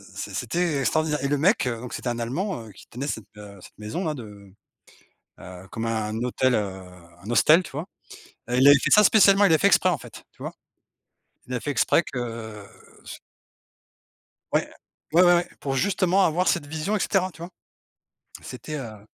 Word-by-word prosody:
c'est - - -6
c'était 170 -5 -1
extraordinaire. 150 +2 0
Et - - +1
le 145 0 0
mec, 185 - +2
heu, 115 -2 -2
donc, 125 0 -8
c'était 125 - -4
un 120 0 -3
Allemand, 135 - -3
heu, - - -12
qui 95 - -17
tenait 135 +4 -6
cette, 110 -8 -4
heu, 100 -2 -12
cette - - -16
maison-là 150 - -3
de, 100 -5 -12 0.9
heu, 90 +1 -11
comme 115 0 -4
un 110 -1 -2
hôtel, 125 0 +1
heu, 95 -3 -2 0.4
un 110 - -7
hostel, 155 +9 +5
tu - - -11
vois? 155 +6 -5 0.6
Heu, 125 - 0
il 135 +2 +5
avait 145 0 +9
fait - - -1
ça 210 - +7
spécialement, 200 -1 +6
il 170 - +3
l'a 160 - +5
fait - - +3
exprès - - +4
en - - 0
fait, - - -13
tu - - -22
vois? - - -5 0.9
Il 125 - -6
a 125 - -1
fait 145 - -3
exprès 150 +6 +2
que 115 -4 -6 0.4
c - - -8 1.4
Ouais, - - +1 0.4
ouais 175 +2 +6
ouais, 175 -1 +4
pour 135 -1 -2
justement 190 +3 +2
avoir 175 +3 0
cette 145 - 0
vision, 160 +8 -2
et - - -1
cetera, 185 -1 0
tu 165 - -16
vois? 175 +2 -8 0.9
C'était 155 - -8
heu 110 -6 -8
135 Hz, 195 wpm, -24 LUFS, 115-175 Hz, 1.4 s, avait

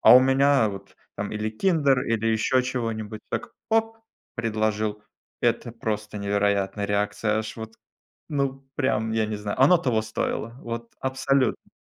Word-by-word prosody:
А - - +9
у - - +8
меня 135 -2 +4
вот 100 0 -10 0.2
там 105 - -4
или 110 0 -2
киндер, 140 - +2
или 115 -1 +1
ещё 110 +3 +2
чего-нибудь, 115 -4 -3
так, 115 - -3 0.2
оп- 225 0 +1 0.4
предложил. 110 -2 -1 0.4
Это 120 - 0
просто 105 -2 -3
невероятная 100 0 0
реакция. 105 +1 0
Аж 110 0 -5
вот, 110 0 -7 0.6
ну, 135 -2 -1
прям 110 -5 +1
я 110 -1 +1
не 105 0 -3
знаю. 105 +3 -4
Оно 145 +7 +7
того 125 -9 +1
стоило, 110 +2 -3
вот 115 0 -6
абсолютно. 130 -1 0
110 Hz, 145 wpm, -25 LUFS, 105-130 Hz, 0.6 s, А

